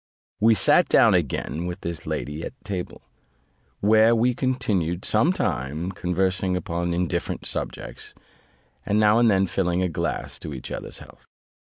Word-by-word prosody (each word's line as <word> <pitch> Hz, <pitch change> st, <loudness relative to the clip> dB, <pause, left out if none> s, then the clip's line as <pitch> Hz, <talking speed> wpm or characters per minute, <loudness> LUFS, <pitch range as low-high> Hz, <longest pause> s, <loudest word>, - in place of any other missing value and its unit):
We 110 Hz, +1 st, +5 dB
sat -, -, +4 dB
down -, -, +5 dB
again 85 Hz, +3 st, -1 dB
with 90 Hz, +2 st, -6 dB
this 85 Hz, -2 st, -6 dB
lady 75 Hz, +2 st, -4 dB
at -, -, -6 dB
table, 95 Hz, -3 st, -5 dB, 0.8 s
where 110 Hz, +2 st, +5 dB
we 120 Hz, +2 st, +2 dB
continued 105 Hz, -, -1 dB
some -, -, +3 dB
time, 75 Hz, +9 st, -2 dB
conversing 90 Hz, +1 st, 0 dB
upon 85 Hz, 0 st, -2 dB
indifferent 90 Hz, -2 st, -2 dB
subjects; -, -, -5 dB, 0.7 s
and 105 Hz, +1 st, +1 dB
now 105 Hz, +1 st, +5 dB
and 120 Hz, -1 st, +5 dB
then 95 Hz, -2 st, +3 dB
filling 90 Hz, -1 st, 0 dB
a 90 Hz, -, 0 dB
glass 80 Hz, -, -3 dB
to 75 Hz, -, -7 dB
each 65 Hz, -, -8 dB
other's -, -, -6 dB
health. -, -, -15 dB
90 Hz, 150 wpm, -24 LUFS, 85-105 Hz, 0.8 s, We